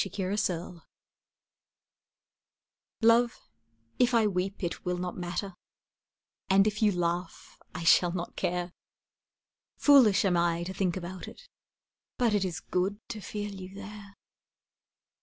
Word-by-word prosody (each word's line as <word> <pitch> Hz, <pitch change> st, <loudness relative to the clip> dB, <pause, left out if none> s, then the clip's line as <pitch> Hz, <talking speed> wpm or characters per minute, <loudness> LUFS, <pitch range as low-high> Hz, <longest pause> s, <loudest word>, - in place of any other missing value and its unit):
The 195 Hz, -, -2 dB
Dream 185 Hz, -3 st, -2 dB, 2.2 s
Love, 230 Hz, +1 st, +4 dB, 0.6 s
if 245 Hz, -1 st, +3 dB
I 225 Hz, -2 st, +4 dB
weep 195 Hz, 0 st, -2 dB
it 170 Hz, -, -3 dB
will 180 Hz, 0 st, -1 dB
not 180 Hz, 0 st, -4 dB
matter, 180 Hz, +2 st, -4 dB, 1.0 s
And 195 Hz, +1 st, +5 dB
if 210 Hz, 0 st, -1 dB
you 215 Hz, -1 st, +4 dB
laugh 175 Hz, -1 st, -3 dB, 0.2 s
I 180 Hz, -, -4 dB
shall 175 Hz, +1 st, +5 dB
not 175 Hz, -1 st, -5 dB
care; 175 Hz, 0 st, -2 dB, 1.1 s
Foolish 235 Hz, -8 st, +6 dB
am 185 Hz, -2 st, +2 dB
I 170 Hz, 0 st, +1 dB
to 185 Hz, +2 st, -5 dB
think 190 Hz, -2 st, -1 dB
about 185 Hz, +1 st, -7 dB
it, -, -, -13 dB, 0.7 s
But 235 Hz, -3 st, +2 dB
it 205 Hz, -2 st, +2 dB
is 185 Hz, 0 st, -3 dB
good 190 Hz, +3 st, -1 dB
to 220 Hz, -3 st, -6 dB
feel 205 Hz, +1 st, -5 dB
you 190 Hz, 0 st, -9 dB
there. 200 Hz, 0 st, -10 dB
190 Hz, 130 wpm, -29 LUFS, 175-210 Hz, 2.2 s, Foolish